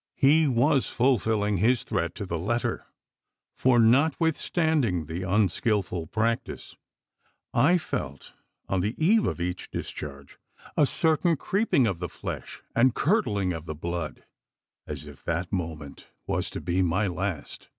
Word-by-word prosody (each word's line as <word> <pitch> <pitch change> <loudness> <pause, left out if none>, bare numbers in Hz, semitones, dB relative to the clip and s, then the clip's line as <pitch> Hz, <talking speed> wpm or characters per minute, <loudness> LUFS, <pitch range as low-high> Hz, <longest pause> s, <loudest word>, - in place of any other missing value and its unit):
He 150 +3 +5
was 130 +2 +2
fulfilling 110 -5 +1
his 120 +6 +2
threat 85 0 -2
to 100 - -5
the 85 -3 -3
letter; 120 +8 -2 0.7
for, 130 -1 +3
notwithstanding 145 - +2
the 80 +4 -5
unskilful 95 -2 0
practice, 115 +5 -2 0.8
I 155 +10 +4
felt, 70 - -5 0.3
on 95 - 0
the 105 +5 -1
eve 210 +8 +3
of - - -2
each 90 +1 -3
discharge, 70 -1 -7 0.4
a 145 - +4
certain 160 +2 +2
creeping 195 - +2
of 95 -6 -1
the 90 -1 -4
flesh, - - -7
and 125 +1 +4
curdling 105 - +1
of 80 0 -7
the 80 - -4
blood, 85 0 -5 0.6
as - - -6
if - - -13
that 85 +3 -2
moment 80 -6 -5 0.2
was - - -1
to - - -6
be 90 +1 0
my 95 +4 +1
last. 95 -3 -4
105 Hz, 140 wpm, -27 LUFS, 85-135 Hz, 0.8 s, He